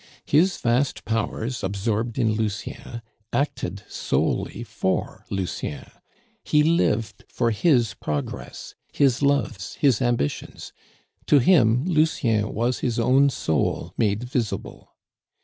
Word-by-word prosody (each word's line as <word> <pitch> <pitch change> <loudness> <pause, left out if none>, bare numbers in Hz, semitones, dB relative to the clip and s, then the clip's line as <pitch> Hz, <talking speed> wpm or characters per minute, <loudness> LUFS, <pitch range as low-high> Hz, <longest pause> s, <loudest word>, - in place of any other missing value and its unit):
His 175 +5 +3
vast 125 +3 0
powers, 115 +1 -2
absorbed 105 +4 -1
in 115 -4 +2
Lucien, 110 +2 -4 0.3
acted 140 +4 -2
solely 120 - -1
for 110 -4 -2
Lucien; 90 -6 -4 0.6
he 150 0 +3
lived 150 -9 +1
for 120 -2 0
his 120 -2 +2
progress, 75 -2 -5 0.2
his 135 -3 +2
loves, 140 -10 0
his 135 -6 +2
ambitions. 120 - -2 0.5
To 145 - +6
him, 125 -3 +4
Lucien 140 - +1
was 120 +4 -1
his 120 -3 -1
own 130 +4 +4
soul 80 - -1
made 105 +1 0
visible. 125 -3 -4
120 Hz, 110 wpm, -24 LUFS, 110-140 Hz, 0.6 s, To